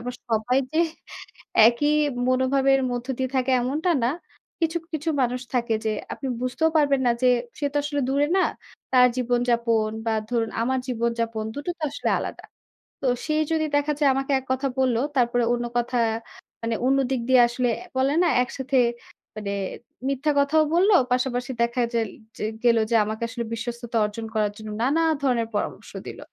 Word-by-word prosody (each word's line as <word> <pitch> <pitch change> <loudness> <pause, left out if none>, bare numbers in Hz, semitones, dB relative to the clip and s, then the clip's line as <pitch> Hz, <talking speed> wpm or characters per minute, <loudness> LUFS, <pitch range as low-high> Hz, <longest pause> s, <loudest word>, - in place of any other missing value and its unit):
আবার 250 +1 -5 0.2
সবাই 225 +4 +1
যে, 320 - 0 0.9
একই 245 +5 +1 0.4
মনোভাবের 270 +1 +3
মধ্য 245 +1 -3
দিয়ে 260 -1 -1
থাকে, 260 0 +1
এমনটা 295 +8 0
না। - - +3 0.5
কিছু, 330 +1 +1 0.2
কিছু 315 +2 -1
মানুষ 250 0 0
থাকে 235 -2 +1
যে, 220 - +1 0.2
আপনি 275 - -6
বুঝতেও 255 +6 +1
পারবেন 280 -3 +3
না - - +5
যে, 255 - +5 0.3
সে 295 - -3
তো - - -4
আসলে 290 0 -2
দূরে 285 +2 +2
না? - - +4 0.5
তার 250 -1 +7
জীবনযাপন 235 -3 +1 0.2
বা 225 - +2 0.2
ধরুন 230 -2 0
আমার 260 +2 +1
জীবনযাপন, 230 -2 -1
দুটো 290 +5 -4
তো - - -13
আসলে - - -2
আলাদা। - - -6 0.6
তো - - -4 0.2
সে 305 - -1 0.2
যদি 315 -1 +1
দেখা 290 +1 +2
যায় 285 -2 +4
আমাকে 270 +1 -2
এক 265 - -15
কথা 260 +1 0
বলল, 255 -3 +2 0.2
তারপরে 240 0 +2
অন্য 240 0 -1
কথা 240 +1 0 0.6
মানে, 230 0 -1
অন্য 270 +1 +3
দিক 260 -3 0
দিয়ে 260 -1 +6
আসলে 245 +1 -1 0.3
বলে 270 +2 +2
না? - - +3 0.2
একসাথে 265 +1 -2 0.6
মানে 210 -2 -4 0.6
মিথ্যা 275 +2 0
কথাও 310 +3 +4
বলল। 370 +4 +4 0.2
পাশাপাশি 250 0 0
দেখা 235 +1 +1
জেল 225 -3 0 0.3
যে - - -5 0.2
গেল 235 -1 +5
যে - - +3
আমাকে 220 +2 -4
আসলে 235 0 -4
বিশ্বস্ততা 235 0 -4
অর্জন 215 +2 -5
করার 210 -1 +1
জন্য, 215 -1 -8
নানা 290 +6 +2 0.2
ধরনের 240 -4 +1
পরামর্শ - - -3 0.2
দিল। - - -8
250 Hz, 170 wpm, -24 LUFS, 235-275 Hz, 0.9 s, তার